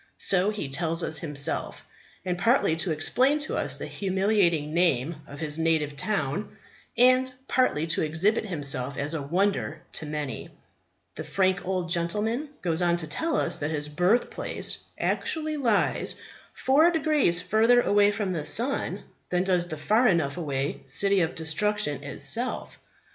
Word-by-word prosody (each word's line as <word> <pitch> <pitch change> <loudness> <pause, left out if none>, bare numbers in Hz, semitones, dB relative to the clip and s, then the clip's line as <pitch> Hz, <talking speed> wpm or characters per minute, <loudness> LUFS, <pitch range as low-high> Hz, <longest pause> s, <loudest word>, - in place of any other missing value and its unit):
So 190 +1 +2
he 210 -8 -4
tells 165 +4 -1
us 160 - -1
himself. 145 -4 -3 0.4
And, 180 -1 -1
partly 210 -3 +2
to 170 +1 +1
explain 255 - +2
to - - -4
us - - 0
the - - -5
humiliating 190 -6 0
name 165 -3 +1
of 145 - -10
his 155 0 -1
native 160 -3 +1
town, 180 0 -3 0.4
and 255 +1 +4 0.2
partly 255 - +1
to 165 0 0
exhibit 185 +9 0
himself 140 -6 -2
as 145 +3 -2
a 160 - -2
wonder 170 0 -1
to 155 - -3
many, 150 -2 -5 0.6
the - - -6
frank 190 -1 0
old 185 -2 -1
gentleman 210 - 0
goes 170 -1 +1
on 175 -1 +2
to 165 - -3
tell 295 - -2
us - - 0
that 145 -1 -2
his 150 -1 -2
birthplace 180 +10 0 0.2
actually 310 -1 -1
lies 235 -7 +1 0.4
four 300 +6 +3
degrees 300 - +2
further 225 +5 +3
away 205 -2 +3
from 200 -2 -2
the 165 -4 -3
sun 245 - +1 0.3
than 180 0 +1
does 180 -2 +1
the 155 -3 -6
far 215 +11 +2
enough 160 -8 +1
away 140 -5 -3
City 200 -1 +3
of 165 0 -1
Destruction 160 -2 -1
itself. 145 - -2
175 Hz, 155 wpm, -26 LUFS, 155-215 Hz, 0.6 s, and